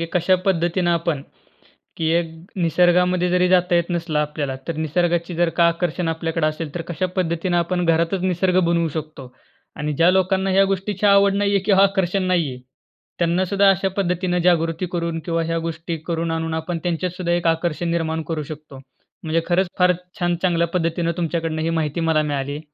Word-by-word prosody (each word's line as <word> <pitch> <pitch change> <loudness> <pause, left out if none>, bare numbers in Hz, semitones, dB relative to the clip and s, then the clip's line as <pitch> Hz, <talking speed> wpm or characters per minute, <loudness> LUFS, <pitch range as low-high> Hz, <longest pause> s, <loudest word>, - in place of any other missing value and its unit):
की 165 - -2
कशा 180 +1 +3
पद्धतीनं 175 -1 +1
आपण 165 -4 -1 0.7
की 160 -1 -1
एक 170 -1 +1 0.3
निसर्गामध्ये 180 +1 +3
जरी 180 0 +3
जाता 180 -1 +3
येत 170 -1 +3
नसलं 165 -3 -1
आपल्याला 150 -3 -2
तर 165 - -2
निसर्गाची 170 +2 0
जर 175 0 +2
का 170 - +4
आकर्षण 170 0 -1
आपल्याकडे 165 -1 -1
असेल 155 0 -4
तर 170 - -3
कशा 175 +2 -1
पद्धतीनं 175 0 0
आपण 175 +1 0
घरातच 170 +3 +1
निसर्ग 185 0 +1
बनवू 170 -1 +1
शकतो. 150 -4 -7 0.4
आणि 150 0 -2
ज्या 165 +5 +4
लोकांना 190 +1 +1
ह्या 195 +1 +4
गोष्टीची 195 +1 -1
आवड 200 0 +5
नाहीये 200 0 +2
किंवा 195 -2 +5
आकर्षण 195 -1 +1
नाहीये 160 -9 0 0.6
त्यांना 175 +2 +1
सुद्धा 200 +2 +3
अशा 195 0 +1
पद्धतीनं 180 -1 0
जागृती 170 0 +1
करून 170 -1 -2
किंवा 165 -1 -1
ह्या 165 0 -1
गोष्टी 165 0 -4
करून 165 -1 -2
आणून 160 0 -2
आपण 165 +1 -3
त्यांच्यात 175 +1 -1
सुद्धा 175 -2 -1
एक 175 -1 0
आकर्षण 165 +1 0
निर्माण 160 -1 -1
करू 160 -2 -2
शकतो. 150 -2 -10 0.4
म्हणजे 160 +1 0
खरंच 185 +1 +2
फार 180 0 +5 0.3
छान 175 0 +1
चांगल्या 170 -2 +2
पद्धतीनं 170 0 0
तुमच्याकडनं 165 -2 -2
ही 165 - 0
माहिती 150 +2 -2
मला 160 -2 +2
मिळाली. 145 0 -3
170 Hz, 175 wpm, -21 LUFS, 165-180 Hz, 0.7 s, आवड